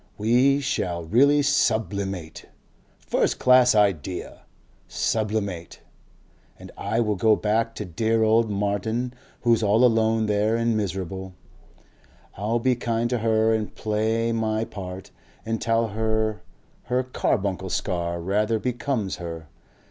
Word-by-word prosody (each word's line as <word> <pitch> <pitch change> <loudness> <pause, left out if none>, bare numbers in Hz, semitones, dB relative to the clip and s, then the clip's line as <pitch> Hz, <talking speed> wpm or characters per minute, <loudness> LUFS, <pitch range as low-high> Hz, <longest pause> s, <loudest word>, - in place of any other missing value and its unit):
We 125 +6 +3
shall 90 -11 -2
really 140 - +4
SUBLIMATE.... 100 - -1 0.5
First - - 0
class 125 -2 +5
idea 95 -4 0 0.5
sublimate!.... 105 -6 -2 0.8
And - - -12
I 115 - -2
will 105 -3 +1
go 110 +3 +4
back 115 +2 0
to 105 - -5
dear 110 +6 0
old 110 +1 +3
Martin 105 +4 -1 0.3
who's 115 -2 +3
all 110 +3 +4
alone 110 -1 +2
there 105 +1 +1
and 115 0 +1
miserable; 95 -2 -4 1.0
I'll 105 +4 -1
be 125 +2 +1
kind 120 0 -1
to 125 - 0
her 110 0 +2
and 110 -1 -3
play 110 +2 0
my 110 -1 0
part 95 -2 -8 0.3
and 115 0 -2
tell 115 0 +1
her 110 0 -1 0.4
her 125 +1 0
Carbuncle 95 -6 -1
scar 85 -2 -2
rather 105 +5 0
becomes 120 -3 -2
her.... 80 -3 -7
110 Hz, 125 wpm, -24 LUFS, 100-115 Hz, 1.0 s, class